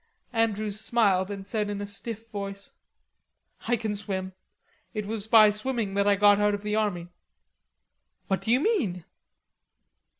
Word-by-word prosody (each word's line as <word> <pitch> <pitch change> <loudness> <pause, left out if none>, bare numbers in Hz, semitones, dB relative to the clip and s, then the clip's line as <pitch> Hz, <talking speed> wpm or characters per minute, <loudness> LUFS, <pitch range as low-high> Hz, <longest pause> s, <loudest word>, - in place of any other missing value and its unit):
Andrews 215 -2 0
smiled, 205 -5 +2
and 200 -1 -7
said 210 -1 -1
in 205 -1 -4
a 205 - -4
stiff 220 +2 -6
voice: 200 -1 -6 1.0
"I 240 - +3
can 220 -2 -3
swim. 190 -2 -3 0.6
It 210 -1 -3
was 215 0 0
by 220 -2 +7
swimming 215 -1 -1
that 200 0 +1
I 205 - +5
got 205 0 +5
out 210 0 +2
of 200 - -9
the 210 0 -1
army." 190 -5 -1 1.2
"What 195 - -1
do - - -5
you 250 +3 +4
mean?" 225 - 0
205 Hz, 155 wpm, -27 LUFS, 200-220 Hz, 1.2 s, by